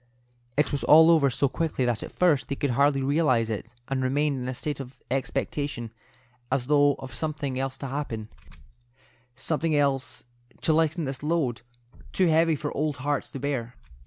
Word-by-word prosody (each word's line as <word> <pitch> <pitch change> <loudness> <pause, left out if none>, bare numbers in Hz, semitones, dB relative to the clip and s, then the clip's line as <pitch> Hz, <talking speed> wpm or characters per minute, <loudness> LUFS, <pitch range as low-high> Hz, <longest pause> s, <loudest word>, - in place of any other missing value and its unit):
It 150 -1 +2
was 140 -4 -2
all 160 +6 +8
over 150 -4 +4
so 135 +3 +1
quickly 150 -2 -1
that 120 -3 0
at - - -7
first 165 -7 +2
they 140 - -1
could 140 -1 -1
hardly 140 +2 +3
realize 130 -6 +2
it, 110 +2 -5 0.2
and 135 -1 -1
remained 140 +1 0
in 125 - -4
a - - -2
state 145 +2 -3
of 135 -1 -8
expectation 135 -2 -2 0.6
as 130 -2 +1
though 145 0 +4
of 130 -2 -9
something 140 -1 -3
else 135 0 -3
to 140 - -5
happen 130 -6 -4 1.1
—something 155 +4 0
else 140 -2 0 0.3
which - - -27
was - - -28
to 160 - +4
lighten 160 +1 +1
this 135 -1 -5
load, 150 -6 0 0.5
too 185 - +3
heavy 165 0 +4
for 145 +1 -4
old 150 -1 -1
hearts 145 +2 -2
to 135 - -5
bear. 125 -4 -3
140 Hz, 185 wpm, -26 LUFS, 130-150 Hz, 1.1 s, all